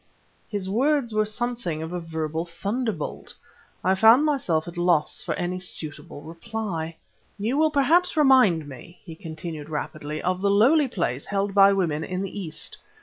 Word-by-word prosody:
His 205 -4 -3
words 255 +3 +1
were 215 0 +2
something 215 -8 -3
of 160 +2 -6
a 180 - -2
verbal 160 -1 -3
thunderbolt; 200 - -4 0.5
I 185 - +3
found 225 +9 +6
myself 185 - 0
at 170 - -8
loss 175 -3 +1
for - - -3
any 180 +1 -3
suitable 150 -5 -5
reply. 165 -1 -5 0.4
"You 220 +6 -1
will 310 +1 +3
perhaps 315 +5 +2
remind 255 - +5
me," 145 +6 -12
he 165 - -8
continued 160 -2 -7
rapidly, 155 0 -4
"of 185 +2 -1
the 200 - +2
lowly 265 +9 +4
place 155 - -2
held 200 0 -1
by 200 0 +7
women 165 -6 0
in 185 +2 -3
the 195 +1 -5
East. 160 -4 -5
185 Hz, 160 wpm, -25 LUFS, 160-225 Hz, 0.5 s, by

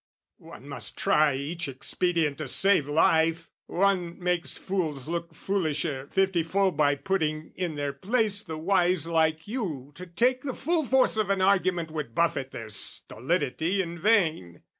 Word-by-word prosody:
One - - -13
must - - -7
try 150 -2 +3
each 160 +5 -4
expedient 155 +2 0
to 155 - -4
save 185 0 +3
life. 165 +2 +2 0.2
One 180 -2 0
makes 180 -1 -1
fools 160 -9 -3
look 170 0 -4
foolisher 155 -7 -2
fifty 190 -2 +2
fold 190 +3 +1
By 145 -1 +3
putting 155 -2 -2
in 175 -4 -3
their 145 -1 -2
place 210 - 0
the 165 -7 -7
wise 175 -1 +2
like 160 0 +1
you 170 - -4
To 180 +4 -10
take 245 +9 +1
the 265 -2 -4
full 320 +1 0
force 260 -3 +3
of 215 -3 0
an 195 -1 +1
argument 185 -4 +2
Would 150 -7 -5
buffet 165 -6 +1
their 115 -4 -8
stolidity 160 - -1
in 170 0 -7
vain. 160 - +1
170 Hz, 155 wpm, -27 LUFS, 155-195 Hz, 0.2 s, try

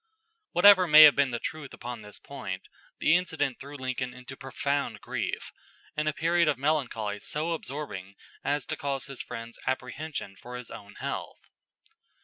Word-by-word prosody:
Whatever 185 0 +8
may 155 0 +11
have 150 - +9
been 140 -2 +3
the 120 - -2
truth 145 +3 -5
upon 120 -2 -6
this 105 -1 -9
point, - - -7 0.3
the 160 - +4
incident 160 -7 0
threw 140 +1 -9
Lincoln 130 -1 -3
into 125 +1 -9
profound 140 +1 -2
grief, - - -3 0.4
and 150 0 0
a - - +4
period 170 +2 +2
of 150 -4 +2
melancholy 125 -8 0
so 155 +9 -2
absorbing 135 - -5 0.3
as 145 -1 0
to - - -3
cause 140 -1 -2
his 135 -2 -7
friends 115 -1 -7
apprehension 130 -4 -3
for 125 +5 -8
his 125 -1 -9
own 100 0 -10
health. - - -5
140 Hz, 160 wpm, -28 LUFS, 125-155 Hz, 0.4 s, may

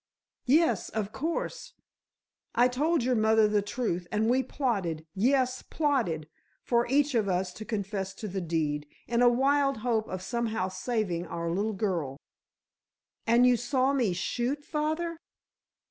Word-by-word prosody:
"Yes, 265 - +3
of 215 -2 -3
course, 335 - -3 0.8
I 245 +1 +5
told 290 +4 +1
your 255 +1 +2
mother 220 -1 +4
the 210 -1 +2
truth, 200 -5 -2
and 220 +2 +2
we 260 +1 +3
plotted—yes, 240 - 0
plotted 235 - -1 0.4
for 235 -1 +2
each 285 +3 +2
of 215 -4 +1
us 180 0 -1
to 215 - -8
confess 195 -3 -3
to 215 - -6
the 190 -1 -3
deed, 155 -3 -1 0.2
in 235 0 +1
a 245 - +7
wild 275 +2 +2
hope 225 -3 +1
of 185 0 -5
somehow 225 -2 -1
saving 185 -3 -2
our 170 0 -3
little 205 +5 0
girl." 175 -10 -2 1.1
"And 235 +2 +5
you 250 0 +6
saw 260 +3 +1
me 245 -8 +2
shoot, 255 +10 -2
father?" 315 +2 -2
225 Hz, 145 wpm, -29 LUFS, 190-260 Hz, 1.1 s, a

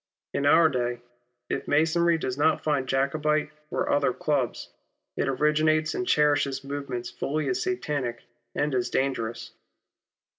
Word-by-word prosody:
Ill - - 0
In 140 - -1
our 160 +2 +6
day, 120 -4 -1 0.5
if - - -3
Masonry 165 +3 +3
does 130 -5 -3
not 150 +3 +2
found 145 -4 0
Jacobite 150 +3 0 0.2
or - - -1
otlier 140 -3 +1
clubs, 140 -6 -1 0.4
it - - -1
originates 155 +3 +2
and 185 - -3
cherishes 145 -3 +2
movements 135 -4 -5
fully 150 +5 -2
as 375 0 0
satanic 145 - -2 0.3
and 145 -1 0
as 125 -1 0
dangerous. 115 -4 -2
145 Hz, 140 wpm, -26 LUFS, 130-155 Hz, 0.5 s, our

